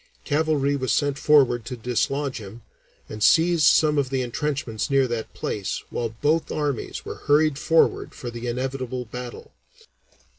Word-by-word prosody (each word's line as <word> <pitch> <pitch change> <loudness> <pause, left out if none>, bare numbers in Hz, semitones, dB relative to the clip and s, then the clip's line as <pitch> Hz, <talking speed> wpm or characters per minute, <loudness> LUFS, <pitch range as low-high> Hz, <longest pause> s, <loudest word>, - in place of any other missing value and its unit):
Cavalry 145 -2 +1
was 130 -2 -1
sent 145 -1 +1
forward 135 -6 +4
to 125 +2 -6
dislodge 130 +3 -1
him, 110 +2 -11 0.4
and 105 - -8
seized 165 +4 +5
some 150 -2 +4
of 135 -2 -1
the 130 -1 -1
entrenchments 125 -2 -3
near 135 -1 +3
that 115 -2 -4
place, 100 -3 -3
while 115 -1 -2
both 155 +3 +1
armies 145 -5 -3
were - - -8
hurried 150 0 +3
forward 165 +1 +2
for 120 - -6
the 120 +1 -6
inevitable 130 0 -3
battle. 125 +1 -8
135 Hz, 150 wpm, -24 LUFS, 120-150 Hz, 0.4 s, seized